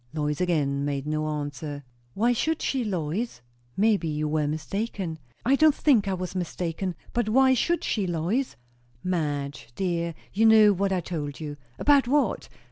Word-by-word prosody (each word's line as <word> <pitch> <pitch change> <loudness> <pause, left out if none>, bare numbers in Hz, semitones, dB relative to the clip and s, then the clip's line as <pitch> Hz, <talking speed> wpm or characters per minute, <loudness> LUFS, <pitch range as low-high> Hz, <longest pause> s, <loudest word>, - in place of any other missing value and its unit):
Lois 150 +1 -1
again 145 -6 +1
made 140 -1 -2
no 155 0 -1
answer. 145 -1 -4 0.3
"Why 235 +4 +3
should 315 +7 0
she, 265 -2 0
Lois?" 190 - -3 0.4
"Maybe 205 -4 +3
you 150 0 -1
were 150 -1 0
mistaken." 175 +2 -3 0.3
"I 265 +3 +5
don't 310 0 +5
think 235 -9 +3
I 195 - 0
was 180 0 -5
mistaken. 180 0 -3 0.2
But 240 -3 0
why 260 +3 +5
should 340 +7 +1
she, 205 -4 0
Lois?" 180 +11 -1 0.5
"Madge, 145 -8 -2
dear, 170 -3 -1 0.2
you 225 +3 +4
know 215 -2 +7
what 195 +1 0
I 185 -2 +1
told 150 -4 -5
you." 150 -2 -5 0.2
"About 285 -3 +4
what?" 275 -4 +1
180 Hz, 160 wpm, -26 LUFS, 150-220 Hz, 0.5 s, know